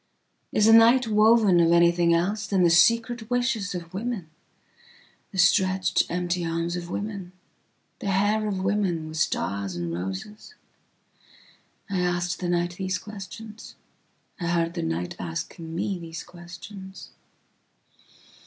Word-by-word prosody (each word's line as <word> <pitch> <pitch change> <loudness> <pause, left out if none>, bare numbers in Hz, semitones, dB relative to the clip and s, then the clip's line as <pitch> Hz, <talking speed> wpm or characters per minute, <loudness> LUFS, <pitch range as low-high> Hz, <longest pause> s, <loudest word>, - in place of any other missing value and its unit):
Is 210 - +3
the 225 - +7
night 230 +2 +6
woven 215 -3 +5
of 170 0 +4
anything 170 0 +4
elsethan 195 +3 +1
the 170 - +4
secret 230 +5 +3
wishes 245 -6 0
of 170 0 -7
women, 200 -5 -4 1.0
the 195 - -8
stretched 185 +1 +3
empty 175 0 -1
arms 165 +1 -2
of 175 -1 -6
women?the 195 -1 -8
hair 205 +3 +1
of 190 -2 -2
women 190 -5 0
with 155 0 -7
stars 100 - -1
and 85 -1 -3
roses?I 185 - -10
asked 175 -1 -1
the 180 - -2
night 175 0 -1
these 185 -1 -1
questions.I 210 -2 -11
heard 170 0 0
the 175 - -3
night 85 +2 -3
asking 160 - -6
me 190 +2 -2
these 165 -1 -7
questions. 185 +3 -11
180 Hz, 120 wpm, -25 LUFS, 170-210 Hz, 1.0 s, the